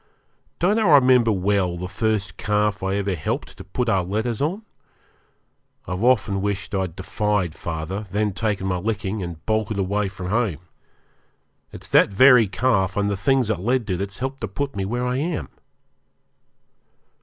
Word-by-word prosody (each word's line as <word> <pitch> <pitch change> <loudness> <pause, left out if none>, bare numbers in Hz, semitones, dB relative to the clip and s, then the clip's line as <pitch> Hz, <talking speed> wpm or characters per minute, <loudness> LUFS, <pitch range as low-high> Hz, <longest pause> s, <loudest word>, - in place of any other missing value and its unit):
Don't 200 +6 +2
I 210 -7 +3
remember 125 -4 +5
well 95 -2 0
the 90 +1 -4
first 100 -2 -1
calf 105 -1 0
I 95 +1 -1
ever 100 -1 -1
helped 80 - -4
to - - -10
put 120 +6 -3
our 95 -5 +2
letters 110 +6 -2
on? 180 +9 -1 1.2
I've 90 +3 -3
often 105 -6 +2
wished 100 -2 -3
I'd 95 -4 -2
defied 95 -2 -1
father, 85 +7 -5
then 105 +1 0
taken 100 -1 -1
my 95 -1 0
licking, 100 +1 -2
and 85 -3 -7
bolted 110 -1 0
away 100 +1 0
from 95 -2 -6
home. 105 -8 0 1.1
It's - - -9
that - - +5
very 125 +2 +6
calf 95 -1 +1
and 100 0 +1
the - - 0
things 125 +2 +2
it 105 - -2
led 120 +5 0
to 95 - -1
that's 100 0 -4
helped 135 +1 -4
to 115 - -2
put 140 +6 -4
me 100 -1 -2
where 120 +5 -2
I 125 +1 -1
am! 160 +4 -2
105 Hz, 165 wpm, -23 LUFS, 95-120 Hz, 1.2 s, very